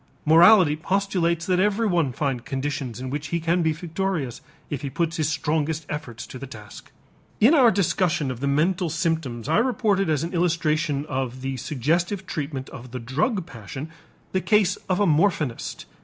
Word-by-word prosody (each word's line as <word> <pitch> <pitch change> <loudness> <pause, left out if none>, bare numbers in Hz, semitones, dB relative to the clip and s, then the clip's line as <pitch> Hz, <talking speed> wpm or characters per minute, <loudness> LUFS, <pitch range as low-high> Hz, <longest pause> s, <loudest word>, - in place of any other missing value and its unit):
Morality 170 +1 +7
postulates 170 -1 0
that 180 -1 +1
everyone 195 - +2
find 130 -2 -2
conditions 135 -3 -3
in 130 0 -5
which 145 +1 -3
he 170 +3 -1
can 170 +2 +1
be 160 -1 +2
victorious 165 - -3 0.3
if 145 -3 -3
he 140 - -3
puts 165 +4 -1
his 155 -2 +1
strongest 155 0 -1
efforts 140 -7 -5
to 130 - -9
the 135 - -7
task. 105 -4 -12 0.5
In 240 +9 +6
our 260 -7 +7
discussion 175 -6 +1
of 125 - -6
the 140 - -1
mental 170 +5 +1
symptoms 160 -8 -2
I 160 +7 +3
reported 215 -6 +1
as 155 -1 +1
an 170 +3 -4
illustration 160 -4 +1
of 130 -3 -3
the 135 0 -3
suggestive 170 - -1
treatment 140 -6 -4
of 125 +1 -10
the 125 +1 -6
drug 155 - -1
passion 130 - -8 0.4
the 190 - 0
case 210 -3 +3
of 185 +1 +1
a 205 - +4
morphinist. 155 - 0
160 Hz, 170 wpm, -24 LUFS, 135-180 Hz, 0.5 s, Morality